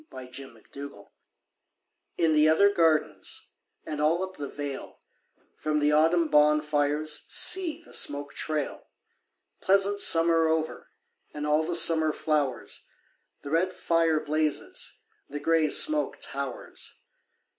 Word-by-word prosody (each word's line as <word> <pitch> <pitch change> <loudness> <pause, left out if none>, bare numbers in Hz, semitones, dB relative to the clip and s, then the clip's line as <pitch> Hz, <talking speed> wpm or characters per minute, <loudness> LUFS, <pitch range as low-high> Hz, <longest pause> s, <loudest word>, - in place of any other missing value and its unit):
VI 130 -1 -9
Autumn 130 -4 -11
Fires 140 0 -7 1.3
In 165 -2 +2
the 155 0 +4
other 200 +6 +4
gardens 160 -4 0 0.3
And 150 -1 -4
all 165 +4 +2
up 190 0 -7
the 145 - -5
vale, 145 -2 -7 0.6
From 155 0 -1
the 150 0 +2
autumn 165 +2 +3
bonfires 150 0 +1
See 345 -3 +2
the - - -17
smoke 145 0 -1
trail! 155 -2 -4 0.7
Pleasant 200 +1 +2
summer 165 -2 +5
over 160 0 -2 0.5
And 150 0 -4
all 150 +1 +2
the 170 +2 -2
summer 160 -2 +4
flowers, 145 -6 -2 0.6
The 140 - -7
red 180 +3 +1
fire 165 -3 +1
blazes, 155 0 -3 0.3
The 145 - -5
grey 160 0 +2
smoke 305 - +2
towers. 140 -2 -6
155 Hz, 125 wpm, -27 LUFS, 145-165 Hz, 1.3 s, summer